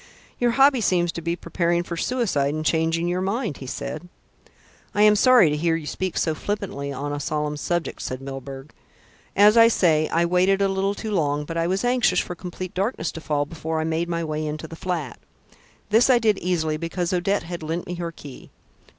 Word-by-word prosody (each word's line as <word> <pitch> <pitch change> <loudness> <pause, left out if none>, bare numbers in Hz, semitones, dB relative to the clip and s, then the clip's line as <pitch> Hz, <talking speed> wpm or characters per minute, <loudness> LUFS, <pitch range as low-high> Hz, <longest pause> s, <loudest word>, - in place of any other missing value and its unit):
"You 245 - +3
hobby 270 +1 +4
seems 175 -4 +2
to 170 - -6
be 170 +1 -1
preparing 175 -1 -1
for 175 - -5
suicide 165 - 0
and 155 0 -4
changing 165 +2 +1
your 180 +1 -1
mind," 200 - -2
he 130 - -9
said. 155 +6 -6 0.9
"I 205 - +4
am 210 0 +6
sorry 240 - +6
to - - 0
hear 165 +2 +1
you 165 -2 -5
speak 185 +4 -3
so 160 - +1
flippantly 165 -6 -4
on 145 +2 -4
a 145 - -3
solemn 150 +1 -2
subject," 175 +3 -2
said 130 - -4
Milburgh. 135 +1 -8 0.6
"As 210 +3 +6
I 230 0 +8
say, 160 -8 +3
I 170 +1 +2
waited 180 +3 +3
a 200 - +3
little 195 +1 0
too 220 - -5
long; 150 -6 0
but 165 - -6
I 165 0 0
was 190 +6 0
anxious 245 -7 +3
for - - -3
complete 180 +1 -7
darkness 190 -3 -1
to 165 - -8
fall 145 -2 0
before 160 +1 -4
I - - 0
made 160 +2 -1
my 170 -1 -1
way 155 -1 -3
into 155 +1 -4
the 165 - -9
flat. 165 - -4 0.7
This 225 +5 +5
I 255 - +6
did 220 -4 +2
easily 160 -3 -1
because 170 +2 -3
Odette 190 +3 0
had 170 +1 -6
lent 165 +2 -3
me 180 - -5
her 170 -1 -4
key. 145 -4 -12
170 Hz, 210 wpm, -23 LUFS, 155-195 Hz, 0.9 s, I